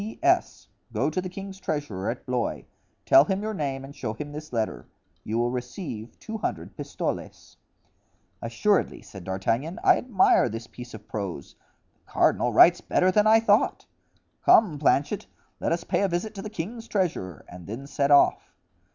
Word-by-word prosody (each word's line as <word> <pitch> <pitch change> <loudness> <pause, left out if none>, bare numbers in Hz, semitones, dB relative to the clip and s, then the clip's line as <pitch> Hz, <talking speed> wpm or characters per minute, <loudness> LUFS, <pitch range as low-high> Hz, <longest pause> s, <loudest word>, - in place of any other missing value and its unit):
"P. 215 +2 -6
S.—Go 350 +1 0
to 185 - -1
the 185 - -5
king's 195 +1 -8
treasurer, 145 - -3
at 120 - -5
Blois; 125 -2 -2 0.4
tell 135 - +7
him 190 +4 -1
your 220 0 -2
name 135 -6 -3
and 140 +1 -12
show 110 -4 -4
him 145 +4 -7
this 150 +1 -8
letter; 115 -3 -2 0.4
you 110 - -2
will 120 +1 +1
receive 125 - -6
two 220 0 -7
hundred 85 - -4
pistoles." - - -5 0.9
"Assuredly," 140 - 0
said 95 -3 -11
D'Artagnan, 115 - -2
"I - - +6
admire 220 - +3
this 115 +1 -6
piece 120 +1 -10
of 105 -1 -13
prose. 95 -9 -5 0.5
The - - -22
cardinal 120 - +3
writes 170 +10 +6
better 185 +1 +2
than 210 +2 +3
I 220 +1 +7
thought. 225 - +2 0.6
Come, 175 -10 +5
Planchet, 145 +6 +1 0.3
let - - -1
us 170 0 0
pay - - 0
a 200 - +3
visit 185 +5 -2
to 200 - -7
the 215 - -6
king's 220 +4 -6
treasurer 150 - -2
and 90 -1 -11
then 115 +7 -6
set 140 0 0
off." 145 -1 +4
145 Hz, 170 wpm, -26 LUFS, 115-195 Hz, 0.9 s, tell